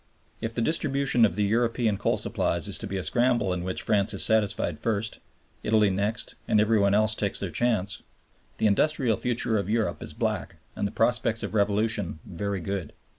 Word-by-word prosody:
If 115 0 -4
the 115 - 0
distribution 140 -5 +2
of 100 - -1
the 105 - +1
European 115 +1 +1
coal 100 - 0
supplies - - -1
is - - -3
to - - -5
be 95 - -3
a 95 - -3
scramble 120 +1 +2
in 90 -1 -3
which 90 0 -3
France 105 -2 +1
is - - +4
satisfied 110 -1 +1
first, 110 -1 -2 0.4
Italy 105 -2 +3
next, 105 +4 -2
and 105 - +3
every 110 +1 +3
one 100 0 +3
else 110 +1 +3
takes 100 -2 -2
their 100 -3 -3
chance, 105 0 0 0.6
the - - 0
industrial 120 +2 +2
future 115 -3 0
of 100 - -4
Europe 110 0 0
is - - -7
black - - -2 0.2
and 100 - -1
the - - -7
prospects 115 -1 0
of - - -3
revolution 105 -2 +1
very 100 0 -4
good. 95 -2 -4
110 Hz, 190 wpm, -26 LUFS, 100-115 Hz, 0.6 s, is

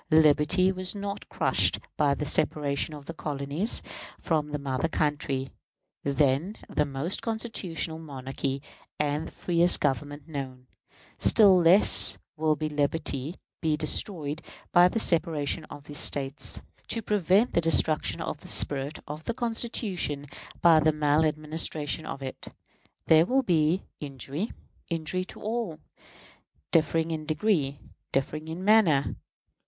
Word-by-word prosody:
Liberty 155 +4 +4
was 185 +1 -4
not 200 0 -5
crushed - - +2 0.2
by 145 -2 +2
the 150 - -4
separation 145 +1 0
of 145 -1 -11
the 165 - -6
colonies 150 +6 -1 0.4
from 155 -3 0
the 150 0 -3
mother 140 +1 -2
country, 145 -4 -1 0.5
then 140 +7 +1
the 150 - 0
most 140 +6 -3
constitutional 190 -8 -3
monarchy 135 -2 -5 0.4
and 150 +1 -1
the - - -11
freest 175 0 +3
Government 145 +1 -2
known. 130 -4 -6 0.5
Still 200 -4 +6
less 180 +3 +6 0.2
will 155 -1 +1
liberty 150 0 -1 0.3
be 155 -2 +1
destroyed 155 -1 -2 0.3
by 175 0 +7
the 225 - -1
separation 160 -4 0
of 145 - -11
these 145 0 -3
States, 135 0 +1 0.2
to 230 0 0
prevent 205 +2 +2
the 170 - +3
destruction 160 -1 +1
of - - -4
the - - -12
spirit 140 +1 +3
of 150 +1 -7
the 235 - -2
Constitution 225 - -2 0.4
by 165 -2 +7
the 155 +1 +3
mal 150 0 +2
administration 155 0 -2
of 135 - -6
it. 130 - -7 0.6
There 160 +1 +5
will 265 +1 +2
be 170 -2 +2 0.2
injury 140 - -5 0.4
injury 170 +2 -2
to - - -12
all; 215 -7 -3 0.9
differing 165 +1 +2
in 155 -1 -4
degree, 155 -4 0 0.3
differing 155 +3 -2
in 170 +4 -6
manner. 195 -10 +4
155 Hz, 130 wpm, -27 LUFS, 145-175 Hz, 0.9 s, by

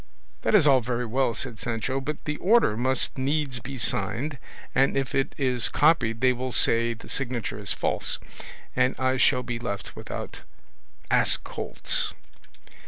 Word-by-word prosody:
"That - - +2
is 180 -8 +6
all 135 -3 +5
very 125 +1 -2
well," 120 0 0
said 115 -1 -5
Sancho, 120 +3 -2
"but 150 +2 -5
the 150 0 -2
order 210 - +3
must 130 +3 +1
needs 140 -1 0
be 135 +3 -7
signed, 125 +6 -1 0.3
and 135 0 +2
if 135 -2 -2
it 135 -1 -1
is 125 -4 +3
copied 145 -7 +2
they 130 0 +4
will 130 +1 -4
say 115 0 +3
the 115 - -14
signature 125 -5 -3
is 100 -4 -3
false, - - -1 0.6
and 130 - +2
I 130 0 +1
shall 125 0 +3
be 120 -2 -4
left 100 -5 -5
without - - -7 0.7
ass - - +4
colts." - - -1
130 Hz, 160 wpm, -26 LUFS, 115-135 Hz, 0.7 s, is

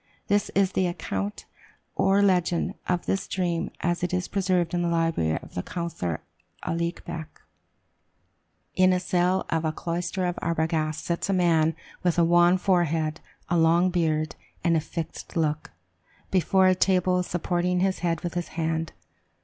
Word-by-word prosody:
This 205 0 +2
is 195 -1 +3
the 185 -1 +1
account 100 - -4 0.5
or 195 +1 +3
legend 180 -3 +2 0.2
of 175 -1 0
this 195 - -1
dream 175 -3 -1
as 175 +1 0
it 180 +1 0
is 180 -1 -1
preserved 185 -3 0
in 175 - +1
the 175 - 0
library 165 - +1
of - - -13
the 90 - -2
counsellor 125 - -4 0.4
Aulique 170 +1 -2
Beck: 165 -2 -7 1.3
"In 185 0 +4
a 180 - +2
cell 180 +1 +1
of 165 0 +1
a 160 - +1
cloister 170 +3 -2
of 175 -1 -2
Arbogast 160 -1 -1
sits 170 +3 -2
a - - +3
man 165 -3 +3 0.3
with 175 -2 +1
a 170 - +5
wan 175 +2 +5
forehead, 165 -5 +1 0.3
a 175 0 +2
long 170 +3 +4
beard, 155 -3 0 0.3
and 165 -2 +2
fixed 165 +1 -6
look, 155 -1 0 0.6
before 190 +1 +3
a 185 - +6
table, 185 -1 +2
supporting 180 0 0
his 190 0 +1
head 165 -2 -1
with 175 - -4
his 175 -1 -2
hand. 160 0 -1
175 Hz, 155 wpm, -26 LUFS, 165-180 Hz, 1.3 s, a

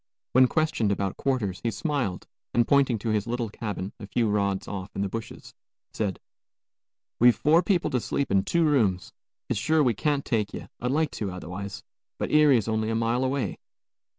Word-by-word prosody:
When 130 0 +6
questioned 140 -9 +1
about 100 -1 -1
quarters, 110 -9 -1
he 115 - 0
smiled 135 - -2 0.3
and 120 -1 +3
pointing 135 -4 +3
to 110 +2 -4
his 105 -1 0
little 120 -1 -2
cabin, 100 -2 -5
a 100 - -8
few 115 +1 +1
rods 100 -2 0
off 95 -1 -6
in 100 - -1
the 100 - -2
bushes, 115 +2 -7 0.4
said, 100 -4 -2 1.0
"We've 120 0 +6
four 160 +3 +4
people 180 -3 +1
to 125 - +1
sleep 140 +2 -2
in 95 0 +4
two 170 -1 +2
rooms; 110 -12 +1 0.3
it's - - -1
sure 155 +7 +3
we 125 -4 +3
can't 145 +5 0
take 105 -4 -1
ye; - - -7
I'd 125 - -2
like 150 +1 +1
to, 105 -3 -3
otherwise. 95 +2 -7 0.3
But - - -3
Erie's 145 -8 +5
only 110 0 0
a 115 - 0
mile 115 +3 +1
away." 130 -7 -1
115 Hz, 185 wpm, -26 LUFS, 100-135 Hz, 1.0 s, When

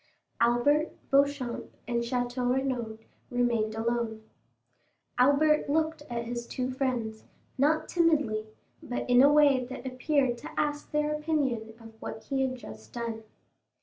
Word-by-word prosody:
Albert, 240 +7 +3 0.2
Beauchamp, 275 -3 +1 0.2
and 235 -1 0
Château 245 +1 -1
Renaud 250 -4 -1 0.3
remained 235 -3 +1
alone. 225 -1 -1 1.0
Albert 285 +4 +4
looked 315 +1 +1
at 235 -1 -3
his 235 0 -4
two 255 0 -2
friends, 245 -5 -2 0.3
not 300 +4 +2
timidly, 295 -11 +2 0.3
but 245 - -4
in 245 0 +6
a 285 +2 +7
way 285 -4 +5
that 250 0 -8
appeared 255 -1 +1
to - - -8
ask 295 0 -1
their 300 0 0
opinion 275 -8 -1
of 225 -1 -14
what 220 0 -6
he 270 -1 -1
had 260 -1 0
just 110 - -11
done. 230 -2 -4
250 Hz, 135 wpm, -29 LUFS, 235-285 Hz, 1.0 s, a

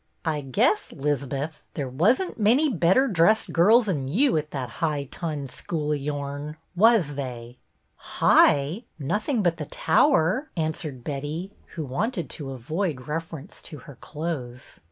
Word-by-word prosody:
" - - -42
I 155 -2 0
guess, 220 - +1
'Lizbeth, 145 +1 -3
there 140 -3 -2
was 170 - +3
n't 370 -9 -5
many 245 +9 +4
better 190 - +3
dressed 210 +2 +3
girls 215 +7 +5
'n 145 -9 -1
you 245 - +2
at 155 -1 -1
that 130 -5 -4
high 150 -3 0
tunned 145 -1 -5
school 150 -3 -3
of 150 - 0
yourn, 145 +1 -4 0.2
was 205 -6 +4
they 125 -3 -7 0.2
" 65 0 -46 0.2
"High? 150 - +4
Nothing 210 - -1
but 170 -2 +1
the - - -5
tower," 285 - +2
an 160 -1 0
swered 140 -6 -7
Betty 150 +7 -4 0.2
who 160 -3 -3
wanted 180 - -2
to 140 -3 -5
avoid 135 +2 -3
reference 165 +2 -6
to 155 - -9
her 145 - -10
clothes. 135 -4 -6
155 Hz, 155 wpm, -25 LUFS, 140-200 Hz, 0.2 s, girls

